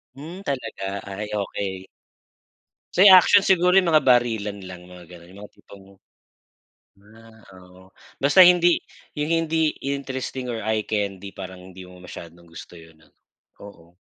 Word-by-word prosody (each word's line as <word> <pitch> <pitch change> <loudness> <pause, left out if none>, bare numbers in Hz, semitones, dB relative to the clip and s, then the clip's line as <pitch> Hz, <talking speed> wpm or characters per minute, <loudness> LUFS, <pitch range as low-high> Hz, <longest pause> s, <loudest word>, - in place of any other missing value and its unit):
Hmm, 165 +7 -10
talaga? 140 - -6 0.2
Ay, 100 +2 -7
okey. 95 -1 -5 1.1
Sa'yo 190 +1 +7
action 195 +2 +6
siguro 180 0 +3
yung 180 -4 +2
mga 155 - +5
barilan 110 -6 0
lang, 90 -1 -12
mga 90 -1 -14
ganun, 85 0 -15
yung 95 +2 -15
mga - - -19
tipong 100 -1 -17 1.2
ah, 110 +1 -19 0.2
oo, 90 0 -19 0.4
basta 165 +7 +6
hindi 175 -1 +4 0.4
yung 150 +2 -2
hindi 160 -1 0 0.2
interesting 130 -2 -5
or 115 - -5
eye 110 0 -2
candy, 100 -2 -4
parang 95 -1 -9
hindi 95 0 -12
mo 90 0 -15
masyadong 85 -1 -12
gusto 85 +1 -13
yun 80 0 -17
ano, - - -27 0.5
oo. 85 -3 -16
105 Hz, 145 wpm, -22 LUFS, 95-150 Hz, 1.2 s, Sa'yo